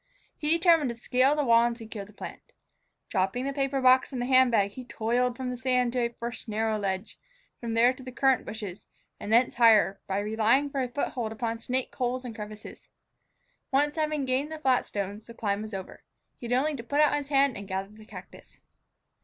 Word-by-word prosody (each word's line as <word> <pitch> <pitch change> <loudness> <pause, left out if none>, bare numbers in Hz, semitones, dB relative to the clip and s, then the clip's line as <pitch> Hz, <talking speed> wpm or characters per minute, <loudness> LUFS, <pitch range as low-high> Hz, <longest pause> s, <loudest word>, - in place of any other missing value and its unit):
He 300 - -3
determined 330 -4 +4
to 235 - -4
scale 255 +4 +2
the 300 - +1
wall 230 -1 +5
and 235 0 0
secure 220 -3 -7
the 210 - -16
plant. 205 - -10 0.6
Dropping 195 +6 0
the 275 - -2
paper 275 0 -1
box 255 +1 +4
and 255 - -4
the 245 - -1
hand 260 0 +5
bag, 200 -4 +2
he 255 +5 -8
toiled 245 +1 -1
from 255 -1 -3
the - - -4
sand 250 -1 +1
to 255 - 0
a 235 -1 +1
first 235 +1 -7
narrow 220 0 0
ledge, 195 0 -4 0.4
from 230 -2 -4
there 240 +2 +5
to 260 - -13
the 255 0 -8
currant 265 0 +2
bushes, 205 -4 -7 0.3
and 205 - -5
thence 240 +3 +4
higher, 220 -4 +4
by 195 - -1
relying 220 +7 +2
for 275 - -1
a 250 - -2
foothold 240 -3 -3
upon 225 +1 -3
snake 255 +2 -2
holes 255 0 -2
and 240 - -6
crevices. 210 -1 -9 0.8
Once 290 +2 +2
having 305 -3 -1
gained 265 +4 -1
the 315 - -5
flat 265 -5 +1
stones, 205 +1 -5
the 235 - -11
climb 205 -2 -1
was 215 0 -7
over. 190 -2 -7 0.4
He 240 - -6
had 245 +1 +2
only 300 +3 0
to 230 - -7
put 285 +5 -1
out 300 -1 +5
his 290 -1 -3
hand 275 -3 +3
and 200 0 -8
gather 190 0 -3
the 215 0 -15
cactus. - - -13
245 Hz, 215 wpm, -28 LUFS, 220-265 Hz, 0.8 s, wall